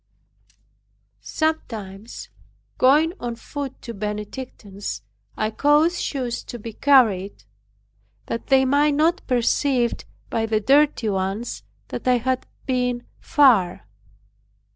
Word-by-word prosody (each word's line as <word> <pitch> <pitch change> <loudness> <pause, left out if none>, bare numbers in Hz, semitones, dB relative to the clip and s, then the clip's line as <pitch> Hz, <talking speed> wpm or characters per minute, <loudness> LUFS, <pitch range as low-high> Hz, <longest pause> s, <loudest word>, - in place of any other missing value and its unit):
Sometimes 225 -10 -4 0.5
going 300 +6 +4
on 240 -1 -4
foot 275 +3 -6
to 235 - -6
the 200 - -13
Benedictines, 210 - -6 0.3
I 215 0 0
caused 300 +8 +3
shoes 250 -4 -3
to 240 - -7
be 225 0 -8
carried, 210 - +3 0.8
that 230 - -5
they 265 -1 +4
might 285 +2 +3
not 320 +4 +2
perceive 245 0 +2 0.4
by 225 -1 0
the 220 -1 +1
dirty 275 0 +3
ones 195 +4 -2 0.3
that - - -6
I 250 -1 +5
had 255 +2 -1 0.2
been 250 -2 -1
far. 220 - +3
245 Hz, 110 wpm, -23 LUFS, 215-280 Hz, 0.8 s, I